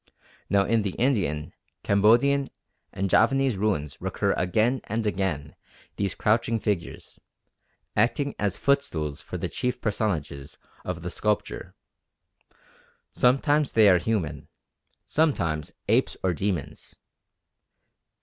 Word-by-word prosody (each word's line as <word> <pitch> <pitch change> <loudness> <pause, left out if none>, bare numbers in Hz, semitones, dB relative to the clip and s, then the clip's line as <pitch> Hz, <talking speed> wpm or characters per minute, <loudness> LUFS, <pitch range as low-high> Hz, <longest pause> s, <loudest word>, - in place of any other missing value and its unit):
Now 100 -1 +3
in 115 +1 +2
the 100 -3 -2
Indian, 95 - 0 0.3
Cambodian, 120 +8 +3 0.4
and 95 - -2
Javanese 135 +5 +3
ruins 95 -8 -2
recur - - 0
again 110 +8 +1
and 110 +1 -2
again 95 -8 -2 0.4
these 100 -2 -1
crouching 115 +1 +1
figures, 100 -6 -4 0.8
acting 140 +4 +1
as 105 -2 0
footstools 80 - 0
for - - -6
the - - -2
chief 125 0 -2
personages 85 - -2 0.3
of 90 -2 -5
the 90 - -4
sculpture. 105 +2 -2 1.4
Sometimes 145 +3 +2
they 110 -2 +6
are 90 -2 +5
human, 95 -6 -2 0.6
sometimes 85 - 0 0.2
apes - - +2
or 95 -1 +2
demons. 85 -5 -4
105 Hz, 110 wpm, -26 LUFS, 85-120 Hz, 1.4 s, they